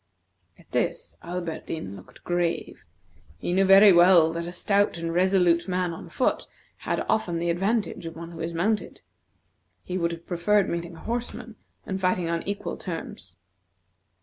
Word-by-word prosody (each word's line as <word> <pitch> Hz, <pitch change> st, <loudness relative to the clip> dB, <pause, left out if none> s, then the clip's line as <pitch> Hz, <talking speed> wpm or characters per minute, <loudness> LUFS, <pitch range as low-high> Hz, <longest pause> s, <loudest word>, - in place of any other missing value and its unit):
At -, -, -22 dB
this, -, -, -2 dB
Alberdin 165 Hz, -, -5 dB
looked 95 Hz, -, -15 dB
grave. 175 Hz, -1 st, -2 dB, 0.5 s
He 175 Hz, -, -3 dB
knew 195 Hz, +1 st, +4 dB
very 195 Hz, +2 st, +8 dB
well 175 Hz, -2 st, +6 dB
that 170 Hz, 0 st, -4 dB
a -, -, -5 dB
stout 200 Hz, +1 st, +1 dB
and 165 Hz, 0 st, -3 dB
resolute 180 Hz, -1 st, +3 dB
man 180 Hz, -2 st, -1 dB
on -, -, -9 dB
foot -, -, 0 dB, 0.3 s
had -, -, -2 dB
often 180 Hz, -6 st, 0 dB
the 170 Hz, +1 st, 0 dB
advantage 190 Hz, -1 st, -1 dB
of 165 Hz, -, -8 dB
one 165 Hz, +1 st, -8 dB
who 165 Hz, -, -10 dB
is 165 Hz, +1 st, -3 dB
mounted. 205 Hz, +6 st, -1 dB, 0.8 s
He 185 Hz, 0 st, -3 dB
would 170 Hz, -1 st, 0 dB
have 170 Hz, 0 st, -8 dB
preferred 190 Hz, +3 st, +2 dB
meeting 170 Hz, 0 st, -4 dB
a -, -, -12 dB
horseman, 235 Hz, -1 st, -5 dB, 0.3 s
and 190 Hz, -1 st, -4 dB
fighting 180 Hz, -2 st, +1 dB
on 170 Hz, 0 st, -1 dB
equal 200 Hz, 0 st, -3 dB
terms. -, -, -7 dB
175 Hz, 160 wpm, -26 LUFS, 170-195 Hz, 0.8 s, very